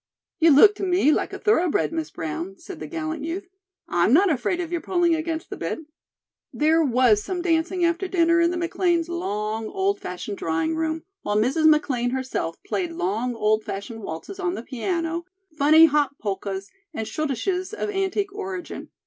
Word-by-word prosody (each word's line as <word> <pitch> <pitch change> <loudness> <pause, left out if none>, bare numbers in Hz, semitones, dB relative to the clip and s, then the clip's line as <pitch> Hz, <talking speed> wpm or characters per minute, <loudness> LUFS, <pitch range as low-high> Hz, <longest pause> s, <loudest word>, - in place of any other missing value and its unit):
"You 330 -1 +6
look 320 +9 +8
to - - -5
me 360 -5 +3
like - - 0
a - - -5
thoroughbred, 360 -6 +2
Miss 320 -1 -3
Brown," 165 +5 -5
said 380 -5 -10
the - - -6
gallant 315 -1 -4
youth. 345 +4 -4 0.4
"I'm 175 +4 +2
not 365 +4 +5
afraid 310 +6 0
of 345 -2 -4
your 345 -1 -1
pulling 350 -2 +2
against 320 0 -3
the - - -5
bit." - - -3 0.7
There 320 +2 +3
was 245 -6 +4
some 355 - -4
dancing 345 +1 +1
after 340 +3 0
dinner 335 -2 +3
in 335 - +4
the 355 - -2
McLean's 345 -1 0
long, 215 - -3
old 390 - 0
fashioned 185 +3 -6
drawing 165 - -1
room, 320 0 -2 0.2
while 205 0 -1
Mrs. 270 +9 +3
McLean 265 -6 +2
herself 260 -10 -3
played 350 -3 -2
long 230 - -1
old 215 0 +1
fashioned 220 +4 -6
waltzes 195 - -7
on 365 -1 -1
the - - -6
piano, 330 +6 -2 0.3
funny 310 +2 +7
hop 290 -2 +1
polkas 195 -1 -4 0.2
and 220 - -2
schottisches 310 - -2
of 435 -1 -3
antique 390 0 -1
origin. 385 -3 -6
320 Hz, 175 wpm, -24 LUFS, 230-350 Hz, 0.7 s, look